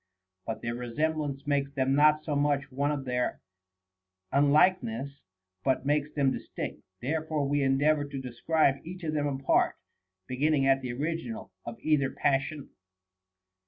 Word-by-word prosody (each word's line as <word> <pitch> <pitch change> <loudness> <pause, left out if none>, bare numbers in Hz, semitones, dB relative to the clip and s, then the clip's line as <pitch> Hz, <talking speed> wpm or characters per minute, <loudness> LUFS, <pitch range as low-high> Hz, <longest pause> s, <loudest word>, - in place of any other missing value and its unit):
But 110 - -4
their 115 0 -2
resemblances 140 +3 -2
make 140 -1 0
them 135 0 +2
not 150 +2 +5
so 150 - -2
much 145 -1 +1
one 140 +3 0
as 140 -2 -3
their 125 -1 -1 0.9
unlike 150 +7 +5
ness 125 +5 -4 0.7
makes 145 +1 +1
them 140 -3 +2
distinct. - - -5 0.2
Therefore 155 +1 -1
we 145 +1 +1
endeavor 145 +3 +3
to 140 -1 -6
describe 135 +3 +1
each 180 +2 -8
of 155 -1 -2
them 145 -1 0
apart, 135 -1 +2 0.5
beginning 135 +3 +1
at 135 0 +4
the 125 -2 -4
original 165 - -4 0.2
of - - -5
either 145 -3 +2
passion. 140 +2 -1
145 Hz, 140 wpm, -29 LUFS, 135-155 Hz, 0.9 s, not